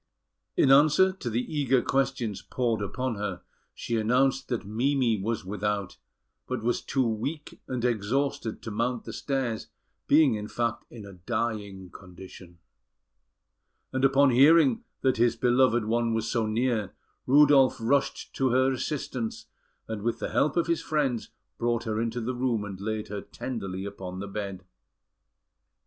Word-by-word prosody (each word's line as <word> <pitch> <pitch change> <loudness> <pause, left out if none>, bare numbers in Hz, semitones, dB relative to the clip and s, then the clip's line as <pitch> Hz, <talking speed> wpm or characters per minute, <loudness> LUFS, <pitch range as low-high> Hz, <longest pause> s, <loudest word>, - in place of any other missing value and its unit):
In 135 - +5
answer 150 +7 +6
to 160 -10 -5
the 115 +2 0
eager 135 -4 +1
questions 135 -6 -1
poured 115 -4 -1
upon 125 +3 -3
her, 95 -3 -4 0.3
she 115 - -2
announced 130 +5 +2
that 120 -5 -3
Mimi 120 0 +1
was 110 -1 -2
without, 105 0 -3 0.5
but 130 -3 -3
was 120 +1 0
too 135 -2 0
weak 140 +8 -4
and 125 -2 -2
exhausted 120 +1 -1
to 115 - -5
mount 115 +3 -1
the - - -8
stairs, 130 -5 -2 0.4
being, 150 -4 +5
in 105 -1 -4
fact, 115 0 -2
in 110 -4 -10
a 100 - -11
dying 100 -1 -4
condition; 90 -1 -13 1.4
and 130 0 -1
upon 135 0 +5
hearing 165 - +5 0.2
that 130 -2 +2
his 120 0 +3
beloved 120 -1 +3
one 115 +1 +1
was 110 0 -1
so 115 -2 0
near, 110 -2 -1 0.3
Rudolf 140 -1 +6
rushed 135 +5 0
to 135 -1 +2
her 130 +2 +3
assistance, 130 -3 -4 0.4
and, 110 -2 -5
with 115 +2 -1
the - - -4
help 150 +3 +1
of 170 - +3
his 170 -1 0
friends, 135 -7 -1 0.3
brought 120 -1 0
her 110 -1 -2
into 115 +1 -2
the 125 +3 -2
room, 120 -4 -1
and 95 -2 -8
laid 110 0 -3
her 105 -1 -4
tenderly 95 -6 -5
upon 95 -2 -7
the 100 +2 -5
bed. 100 -2 -5
120 Hz, 155 wpm, -27 LUFS, 105-130 Hz, 1.4 s, answer